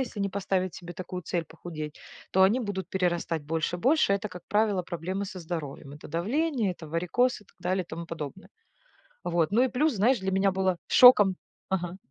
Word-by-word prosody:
если 230 -5 -4
не 200 - 0
поставить 190 -2 -1
себе 175 -1 -8
такую 180 0 -6
цель 170 +1 -2
похудеть, 160 -2 -8 0.3
то 190 - +4
они 215 +7 +4
будут 205 -4 -4
перерастать 175 -4 0
больше 160 +3 -1
больше. 265 - +3
Это, 200 +2 -1
как 180 -3 -10
правило, 205 -3 +2
проблемы 180 +4 -4
со 190 -1 -7
здоровьем 155 -4 -6
это 150 - -11
давление, 230 - 0
это 165 -2 -11
варикоз, 180 +11 +1
и 210 - -19
так - - -27
далее, 185 +1 0
и - - -32
тому 170 0 -6
подобное. 165 +3 -7 0.8
Вот, 170 -2 +1
ну 230 +4 +4
и 260 - +1
плюс, 295 +3 +1
знаешь, 230 +4 +3
для 190 0 -2
меня 195 +1 +3
было 190 -1 0
шоком 210 -7 +8 0.3
Ага. 180 -1 -2
185 Hz, 195 wpm, -28 LUFS, 170-205 Hz, 0.8 s, шоком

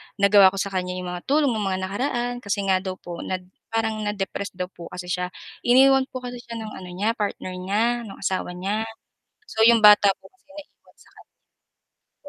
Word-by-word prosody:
nagawa 200 -1 +6
ko 190 - +1
sa 195 0 -2
kanya, 180 -1 -2
'yong 180 -1 -5
mga 180 0 -7
tulong 285 -1 +3
ng 220 - -2
mga 185 0 -1
nakaraan 240 +5 -1
kasi 200 -2 -2
nga 190 -1 +3
daw 185 -1 -4
po 175 -2 -9
nad 185 -1 -3 0.3
parang 225 -1 -1
na-depress 200 0 -3
daw 180 0 -3
po 170 - -10
kasi 180 0 -7
siya. 180 0 -1 0.4
Iniwan 265 +2 +6
po 255 - -5
kasi 245 0 -6
siya 235 -1 -8
ng 215 -1 -6
ano 185 - -9
niya, 210 +4 +1
partner 205 -3 -3
niya, 200 +4 0 0.2
nung 195 - -9
asawa 185 -2 -2
niya. 200 +5 -2 0.6
So, 220 - -8
'yong 235 -1 +6
bata 210 -1 +8 0.2
po - - -13
kasi 375 - -35
naiwan 300 -1 -14
sa - - -22 1.0
kanya. - - -18
200 Hz, 200 wpm, -24 LUFS, 185-230 Hz, 1.0 s, bata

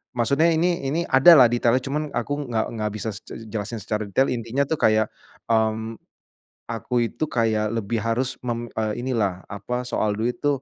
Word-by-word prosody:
Maksudnya 140 +7 +2
ini 170 -3 0
ini 155 +5 0
ada 135 +3 +6
lah 125 - +8
detailnya, 120 +1 +2
cuma 145 +2 -1 0.2
aku 145 - -1 0.2
nggak 110 -2 0
nggak 105 -1 -1
bisa 110 +1 -3
se 110 - -11 0.2
jelasin 110 +1 -4
secara 110 0 -2
detail. 130 +8 +2
Intinya 120 +3 -1
tuh 155 +2 -2
kayak, 110 0 +3 0.4
mmm, 110 0 0 0.7
aku 115 +2 -4 0.2
itu - - -4
kayak 110 -4 0
lebih 115 +1 -1
harus 120 +3 -1
mem 120 0 -2
eee, 110 -1 0
inilah, 105 -8 -1
apa, 125 +5 -3
soal 105 -3 0
duit 115 +3 -2
tuh, 145 -2 +2
115 Hz, 175 wpm, -23 LUFS, 110-130 Hz, 0.7 s, lah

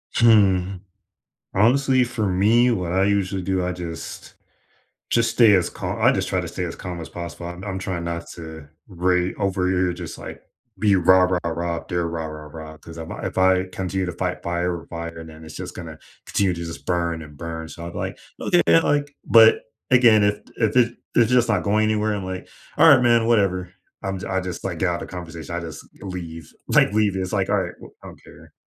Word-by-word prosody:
Hmm. 100 -5 +4 0.8
Honestly, 130 +5 +4
for 115 -3 -2
me, 110 +7 +4
what 90 -7 -1
I 95 +1 +3
usually 100 -1 0
do, 95 0 0
I 90 - -1
just 85 -2 -7 0.8
just 115 -1 +2
stay 115 -2 +5
as 90 -3 +3
cal - - -5
I - - +5
just - - -1
try - - 0
to - - -5
stay 90 - -4
as 85 - -5
calm 90 -1 -6
as 80 - -8
possible. 85 0 -7
I'm 85 +2 -8
I'm 95 -2 -4
trying 90 -2 -3
not 85 0 -4
to 80 -3 -9 0.2
rai 90 -1 0
over 95 -2 0
here, 95 0 +2
you're 90 - -1
just - - -7
like, - - -9 0.4
be 105 -1 +4
rah-rah-rah 90 -2 +2
if 80 - -9
they're 85 -2 -1
rah-rah-rah 80 -1 -7
'cause 85 0 -12
if 80 -1 -7
I - - -6
if - - -8
I 95 0 +4
continue 95 +1 -2
to 90 - -3
fight 90 +1 -3
fire 85 0 -1
with - - -16
fire, 85 -1 -6
then 80 0 -12
it's 80 -2 -10
just - - -7
gonna - - -8 0.3
continue 95 -3 +1
to 85 0 -5
just 85 - -8
burn 85 -2 -1
and 75 -2 -12
burn. 80 +1 -6
So 85 +1 -9
I'm 85 - -7
like, - - -4 0.2
"Okay," 85 - +3 0.2
like, 145 -1 0
but 115 -1 +7 0.3
again, 115 -4 +6
if 105 0 +3 0.2
i 115 - +4
if 110 - -2
it 120 -1 +3 0.2
it's 120 0 +4
just 125 -2 +3
not 105 -5 +1
going 105 +1 +2
anywhere, 110 0 +1
I'm 100 -2 -4
like, 95 0 -6 0.3
"Alright, - - +7
man, 120 -1 +4
whatever." 95 -6 +1 0.3
I'm 95 -1 -3
I 95 0 0
just, 90 -2 -6
like, 90 -4 -3
get 95 - +2
out 85 0 -2
of - - -6
conversation, 85 -2 -7
I - - -1
just 80 -2 -8
g - - -23
leave, 85 -4 -7 0.2
like, - - +4
leave. 105 -2 +2
It's 95 -1 -3
like, - - 0
alright, - - 0
w - - -14
I - - -9
don't - - -13
care. - - -16
90 Hz, 215 wpm, -23 LUFS, 85-105 Hz, 0.8 s, but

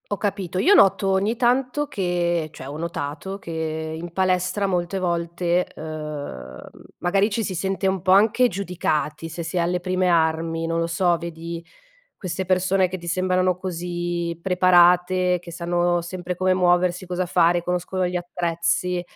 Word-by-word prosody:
Ho - - -2
capito, 195 -4 -3
io 370 - +5
noto 195 - +5
ogni 200 +5 +1
tanto 255 +4 +1
che 175 - -1
cioè, 130 - -10
ho 145 - -7
notato 170 +3 -5
che 160 -2 -4
in 170 +1 -7
palestra 185 +2 +1
molte 180 0 -1
volte, 170 0 0
uhm, 150 - -7 0.4
magari 195 +4 +2
ci 220 +1 -1
si 185 - -4
sente 190 +2 -1
un 190 -1 0
po' 185 - +1
anche 220 +5 +5
giudicati, 165 -5 -2
se 165 +2 -6
sei 170 +2 -1
alle 175 +1 0
prime 185 0 0
armi. 165 0 +1
Non 165 0 -1
lo 165 - 0
so, 175 +1 +2
vedi 170 0 -7 0.5
queste 185 -1 -3
persone 185 0 +2
che 185 - -4
ti 170 -1 -10
sembrano 185 +1 +1
così 175 -1 -3
preparate, 180 0 +4
che 175 - -12
sanno 175 0 0
sempre 180 +1 -5
come 185 +1 +2
muoversi, 180 0 +2
cosa 180 0 -2
fare, 175 0 +3
conoscono 180 +1 -1
gli 180 0 -1
attrezzi 175 +1 -1
180 Hz, 155 wpm, -23 LUFS, 170-185 Hz, 0.5 s, io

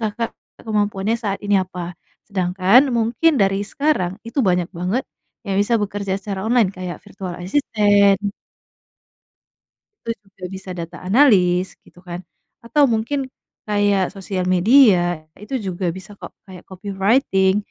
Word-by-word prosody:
Kakak 225 +1 -2 0.3
kemampuannya 210 -1 -1
saat 200 -4 -3
ini 200 -1 +3
apa, 180 -1 -5 0.4
sedangkan, 190 +6 +3
mungkin 240 +7 +2
dari 195 0 +2
sekarang, 215 -7 -1
itu 235 +5 -2
banyak 180 -6 +1
banget 185 +9 -2 0.4
yang 195 -1 -1
bisa 230 +3 +2
bekerja 200 -1 -2
secara 195 -1 -5
online, 235 -5 +3
kayak, 185 -2 -6
virtual-assistant 200 +1 +1 1.9
itu 230 - -2 0.2
juga 185 - -16
bisa, 190 0 -10
data-analyst 185 - +2
gitu 175 - -19
kan, 175 0 -5 0.5
atau 290 +5 +3
mungkin, 230 +6 -1 0.5
kayak, 205 -2 +2
sosial 190 -1 -3
media, 215 0 +6 0.4
itu 265 +5 -5
juga 185 0 -3
bisa 190 +2 -11
kok, - - -9
kayak, 185 -2 -12
copywriting. 195 +1 +1
200 Hz, 120 wpm, -20 LUFS, 185-225 Hz, 1.9 s, media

